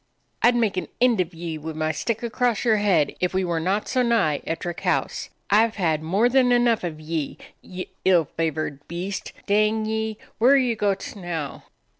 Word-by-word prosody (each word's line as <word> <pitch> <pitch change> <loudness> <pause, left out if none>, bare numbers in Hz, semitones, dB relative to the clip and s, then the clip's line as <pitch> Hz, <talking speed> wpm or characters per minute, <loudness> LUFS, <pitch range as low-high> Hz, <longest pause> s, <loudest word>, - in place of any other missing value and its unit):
"I - - +6
'd 245 - +1
make 220 -5 +1
an - - -2
end 240 -5 +4
of 180 -1 -3
ye 165 -1 -5
wi' 160 +1 -6
my 155 0 -1
stick 225 +9 -3
across 240 -1 0
your 220 -2 +4
head 185 -8 +2
if 180 +1 -1
we 190 0 +1
were 170 -2 -1
not 190 +5 0
so 255 - +1
nigh 230 -12 +2
Ettrick 170 +1 -3
House. - - -1 0.2
I 215 +3 +6
've 225 - -12
had 160 -6 0
more 195 +9 +2
than 250 0 +3
enough 240 -2 +3
of 160 -3 -4
ye, 155 -1 -3 0.2
ye 185 0 -7
ill 180 -4 +4
favored 155 -2 -3
beast. 180 +4 -4
Dang 215 +2 +2
ye! 220 0 -2 0.2
where 250 +5 +6
are - - +6
ye 250 -4 +2
gohT 200 -1 -1
now?" 170 -7 -5
195 Hz, 200 wpm, -24 LUFS, 165-225 Hz, 0.2 s, I